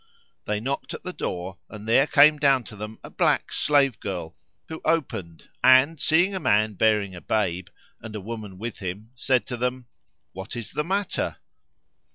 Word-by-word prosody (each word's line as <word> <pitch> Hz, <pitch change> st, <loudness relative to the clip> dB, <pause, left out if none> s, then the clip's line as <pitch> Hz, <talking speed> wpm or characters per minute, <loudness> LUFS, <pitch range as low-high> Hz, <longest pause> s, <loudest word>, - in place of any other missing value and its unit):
They 105 Hz, 0 st, -1 dB
knocked 135 Hz, +5 st, -3 dB
at -, -, -10 dB
the 180 Hz, -, -5 dB
door, 90 Hz, -, -5 dB
and 105 Hz, 0 st, -10 dB
there 135 Hz, +5 st, +4 dB
came 150 Hz, +1 st, +6 dB
down 135 Hz, -3 st, +4 dB
to 110 Hz, -, -10 dB
them 105 Hz, +2 st, -7 dB
a -, -, -10 dB
black -, -, +1 dB
slave 135 Hz, -7 st, +2 dB
girl 90 Hz, -5 st, -5 dB, 0.3 s
who 160 Hz, -, -7 dB
opened 120 Hz, -, -2 dB, 0.2 s
and, 130 Hz, +5 st, +6 dB
seeing 175 Hz, +5 st, +3 dB
a 190 Hz, -, -2 dB
man 110 Hz, -, +2 dB
bearing 105 Hz, -1 st, +2 dB
a 90 Hz, -, -9 dB
babe, 95 Hz, -5 st, -1 dB, 0.3 s
and 110 Hz, -1 st, -8 dB
a -, -, -3 dB
woman 105 Hz, -2 st, -7 dB
with 115 Hz, +3 st, -6 dB
him, 100 Hz, +4 st, -6 dB
said 130 Hz, -1 st, +1 dB
to 125 Hz, -, -5 dB
them, 125 Hz, +1 st, -2 dB, 0.5 s
"What 95 Hz, +6 st, -7 dB
is 120 Hz, -2 st, -6 dB
the 150 Hz, -, -1 dB
matter?" 195 Hz, +4 st, -1 dB
115 Hz, 180 wpm, -25 LUFS, 105-140 Hz, 0.5 s, came